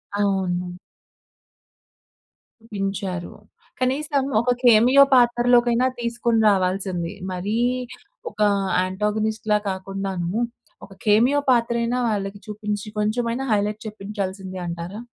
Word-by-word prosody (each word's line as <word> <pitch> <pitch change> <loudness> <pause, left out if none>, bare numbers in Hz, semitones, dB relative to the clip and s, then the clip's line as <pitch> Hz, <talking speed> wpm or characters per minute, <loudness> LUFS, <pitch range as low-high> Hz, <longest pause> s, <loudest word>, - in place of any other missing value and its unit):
అవును. 180 -3 -1 2.0
పించారు. 195 -3 -3 0.5
కనీసం 275 +2 0 0.2
ఒక 250 +1 +1
కెమియో 245 +4 +7
పాత్రలోకైనా 240 0 +4
తీసుకొని 235 -1 0
రావాల్సింది. 185 -2 -1 0.2
మరీ 200 +5 -2 0.7
ఒక - - -24 0.4
యాంటాగనిస్ట్‌లా 210 +3 0
కాకుండాను 190 -2 -4 0.5
ఒక, - - -21
కెమియో 235 +7 +4
పాత్ర 235 -1 +3
అయినా 245 +2 0
వాళ్ళకి 200 -2 -2
చూపించి, 210 0 -4
కొంచెమైనా 230 +4 -1
హైలైట్ 210 +1 0
చెప్పించాల్సింది 195 -3 -5
అంటారా? 170 +5 -6
210 Hz, 85 wpm, -23 LUFS, 190-235 Hz, 2.0 s, కెమియో